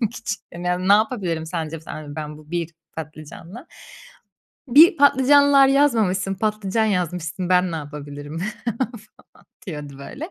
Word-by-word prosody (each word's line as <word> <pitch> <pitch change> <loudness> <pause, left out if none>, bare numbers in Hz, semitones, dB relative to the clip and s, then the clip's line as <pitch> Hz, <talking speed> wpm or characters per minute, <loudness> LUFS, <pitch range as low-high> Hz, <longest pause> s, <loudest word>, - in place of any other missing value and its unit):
için. 205 -2 -4
Yani, 175 +1 -5
ya, 180 0 0
ne 190 +2 +4
yapabilirim 200 -7 0
sence 160 -1 -4
sen 155 -1 -8
dedim 145 -1 -9
ben 150 -1 -6
bu 155 +1 -17
1 170 -1 -2 0.3
patlıcanla. 160 - -9 1.0
Bir 315 +7 +7
patlıcanlar 280 0 +6
yazmamışsın. 220 -9 +2
Patlıcan 215 +1 -1
yazmışsın. 180 -2 -2
Ben 180 -1 +3
ne - - -2
yapabilirim 145 0 -8 0.4
falan 260 -1 -2 0.7
diyordu 145 -5 -7
böyle. 290 - -8
180 Hz, 135 wpm, -22 LUFS, 155-225 Hz, 1.0 s, Bir